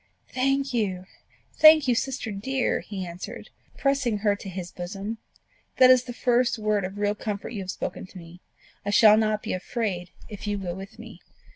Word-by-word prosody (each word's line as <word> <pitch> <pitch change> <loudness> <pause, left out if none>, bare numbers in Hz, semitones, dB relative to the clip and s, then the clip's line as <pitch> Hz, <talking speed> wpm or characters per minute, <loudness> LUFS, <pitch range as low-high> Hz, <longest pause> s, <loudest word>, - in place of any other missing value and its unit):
"Thank 270 +1 0
you! 190 -6 -1 0.5
thank 310 -2 +8
you, 250 - +4
sister 250 -1 -2
dear!" 255 +6 -1
he 195 -3 -6
answered, 175 +1 -8 0.3
pressing 275 -5 +1
her 205 0 +1
to 200 - -9
his 180 -1 -6
bosom: 195 +5 -6 0.6
"that 255 0 +8
is 255 -1 +4
the 250 - -6
first 245 0 +1
word 210 -3 0
of 190 +2 -7
real 205 0 +1
comfort 210 -1 -5
you 210 - -4
have 185 -1 -6
spoken 185 - -5
to 185 - -13
me. 175 +1 -12 0.4
I 205 - -3
shall 215 +1 +7
not 215 -1 +1
be - - -3
afraid 185 -2 -3 0.2
if 210 -1 -8
you 205 0 -1
go 180 -3 -4
with 195 +5 -10
me." 230 0 -12
210 Hz, 185 wpm, -25 LUFS, 190-245 Hz, 0.6 s, thank